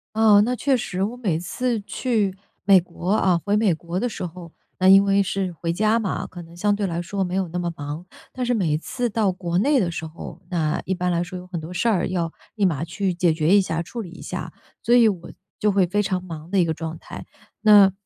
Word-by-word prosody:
哦， 215 Hz, -2 st, +6 dB
那 250 Hz, +2 st, -1 dB
确 270 Hz, +4 st, +2 dB
实。 190 Hz, -5 st, -3 dB
我 225 Hz, +4 st, -4 dB
每 195 Hz, -10 st, -1 dB
次 235 Hz, +6 st, -2 dB
去 210 Hz, -3 st, -1 dB, 0.3 s
美 195 Hz, -1 st, +7 dB
国 175 Hz, +2 st, -4 dB
啊 190 Hz, -5 st, +3 dB
回 205 Hz, 0 st, +2 dB
美 210 Hz, -3 st, +3 dB
国 170 Hz, +3 st, -4 dB
的 245 Hz, -, 0 dB
时 190 Hz, -5 st, -5 dB
候， 170 Hz, -1 st, -10 dB, 0.3 s
那 185 Hz, -, +4 dB
因 195 Hz, +1 st, +8 dB
为 200 Hz, 0 st, +3 dB
是 195 Hz, -1 st, -2 dB
回 165 Hz, 0 st, -3 dB
家 215 Hz, +5 st, +2 dB
嘛， 205 Hz, -4 st, -2 dB
可 175 Hz, -1 st, -10 dB
能 170 Hz, +1 st, -14 dB
相 205 Hz, +3 st, +2 dB
对 205 Hz, 0 st, -2 dB
来 170 Hz, -2 st, -2 dB
说 195 Hz, +3 st, -3 dB
没 180 Hz, 0 st, -2 dB
有 190 Hz, -1 st, 0 dB
那 175 Hz, +2 st, -4 dB
么 175 Hz, -1 st, -2 dB
忙。 145 Hz, +3 st, -6 dB, 0.3 s
但 255 Hz, -, -3 dB
是 245 Hz, -, +1 dB
每 175 Hz, -10 st, +1 dB
次 245 Hz, +10 st, -3 dB
到 215 Hz, -3 st, +1 dB
国 175 Hz, -2 st, -3 dB
内 275 Hz, +7 st, +3 dB
的 190 Hz, -8 st, +1 dB
时 160 Hz, -, -4 dB
候， 160 Hz, +1 st, -9 dB
那 160 Hz, -4 st, 0 dB
一 190 Hz, -, -1 dB
般 180 Hz, 0 st, -1 dB
来 170 Hz, 0 st, +1 dB
说 180 Hz, +1 st, -6 dB
有 180 Hz, -, -10 dB
很 180 Hz, -2 st, -5 dB
多 160 Hz, +3 st, -8 dB
事 180 Hz, +6 st, 0 dB
儿 195 Hz, -6 st, +1 dB
要 170 Hz, -3 st, -2 dB, 0.2 s
立 205 Hz, -, +1 dB
马 160 Hz, -6 st, -1 dB
去 185 Hz, +2 st, -2 dB
解 175 Hz, -1 st, +2 dB
决 160 Hz, +4 st, +3 dB
一 -, -, +6 dB
下、 165 Hz, -3 st, -2 dB
处 230 Hz, +8 st, -7 dB
理 180 Hz, -, -9 dB
一 180 Hz, -, -12 dB
下。 -, -, -6 dB, 0.3 s
所 240 Hz, -, 0 dB
以 235 Hz, -2 st, +6 dB
我 180 Hz, -5 st, -4 dB, 0.3 s
就 210 Hz, -, +3 dB
会 195 Hz, -2 st, +3 dB
非 205 Hz, +4 st, +1 dB
常 185 Hz, -2 st, -2 dB
忙 165 Hz, -2 st, -8 dB
的 200 Hz, -, +1 dB
一 180 Hz, -, +5 dB
个 160 Hz, -1 st, -1 dB
状 160 Hz, 0 st, -6 dB
态。 -, -, -9 dB, 0.4 s
那， 205 Hz, -3 st, +7 dB
185 Hz, 270 characters per minute, -23 LUFS, 170-205 Hz, 0.4 s, 因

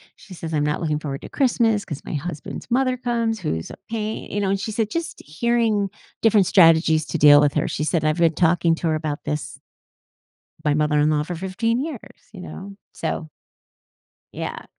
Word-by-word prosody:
she 195 Hz, -, -14 dB
says, 165 Hz, -2 st, -6 dB
“I'm 150 Hz, -1 st, +1 dB
not 150 Hz, +2 st, -1 dB
looking 150 Hz, -2 st, 0 dB
forward 140 Hz, -3 st, -5 dB
to -, -, -9 dB
Christmas 230 Hz, -6 st, +1 dB
‘cause 150 Hz, -5 st, -6 dB
my -, -, -5 dB
husband's 155 Hz, +6 st, -6 dB
mother 255 Hz, 0 st, +2 dB
comes 230 Hz, -2 st, -1 dB
who's 80 Hz, -, -3 dB
a -, -, -8 dB
pain," 220 Hz, -1 st, -4 dB
you 205 Hz, -, -1 dB
know? 195 Hz, -, 0 dB
And 195 Hz, -, 0 dB
she 210 Hz, +3 st, -4 dB
said, 215 Hz, 0 st, -1 dB
“Just 335 Hz, +4 st, -4 dB
hearing 215 Hz, +3 st, +1 dB, 0.3 s
different 210 Hz, -5 st, +4 dB
strategies 160 Hz, -4 st, +5 dB
to 165 Hz, -, -3 dB
deal 145 Hz, 0 st, +8 dB
with 145 Hz, -1 st, +3 dB
her,” -, -, 0 dB
she 150 Hz, -, -2 dB
said, 160 Hz, -2 st, 0 dB
“I've 155 Hz, +2 st, +1 dB
been 165 Hz, -1 st, +3 dB
talking 170 Hz, -1 st, +3 dB
to 165 Hz, -, -2 dB
her 155 Hz, -, +2 dB
about 155 Hz, -1 st, -4 dB
this" 150 Hz, 0 st, -4 dB, 1.1 s
"my 150 Hz, -1 st, +3 dB
mother-in-law, 150 Hz, 0 st, +2 dB
for 175 Hz, +2 st, -5 dB
15 200 Hz, +7 st, -1 dB
years.” 290 Hz, -5 st, -7 dB
You 190 Hz, -4 st, -10 dB
know? 195 Hz, +2 st, -9 dB, 0.2 s
So 155 Hz, -1 st, -4 dB, 1.0 s
yeah. -, -, -5 dB
175 Hz, 190 wpm, -22 LUFS, 155-220 Hz, 1.1 s, deal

